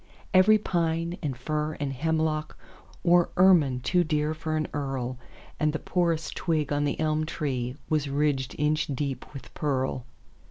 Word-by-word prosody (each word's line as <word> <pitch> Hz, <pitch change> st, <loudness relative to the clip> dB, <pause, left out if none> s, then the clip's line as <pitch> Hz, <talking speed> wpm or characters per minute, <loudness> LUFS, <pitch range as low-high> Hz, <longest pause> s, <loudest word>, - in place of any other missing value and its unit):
Every 195 Hz, +4 st, +7 dB
pine 170 Hz, -3 st, -1 dB
and 140 Hz, -6 st, -3 dB
fir 150 Hz, +4 st, -2 dB
and 140 Hz, -2 st, -2 dB
hemlockWore 160 Hz, +4 st, 0 dB
ermine 165 Hz, -9 st, +5 dB
too 180 Hz, +6 st, +2 dB
dear 150 Hz, -1 st, 0 dB
for 155 Hz, 0 st, -3 dB
an 155 Hz, -, -1 dB
earl, 130 Hz, -3 st, -3 dB, 0.4 s
And 150 Hz, 0 st, +2 dB
the -, -, 0 dB
poorest 170 Hz, -1 st, -1 dB
twig 155 Hz, -4 st, 0 dB
on 145 Hz, 0 st, +1 dB
the 145 Hz, -, -2 dB
elm 155 Hz, 0 st, +1 dB
treeWas 145 Hz, -1 st, -2 dB
ridged 140 Hz, -2 st, 0 dB
inch 150 Hz, +1 st, +1 dB
deep 135 Hz, -2 st, -4 dB
with 135 Hz, -, -10 dB
pearl. 130 Hz, -3 st, -1 dB
150 Hz, 145 wpm, -27 LUFS, 140-160 Hz, 0.4 s, Every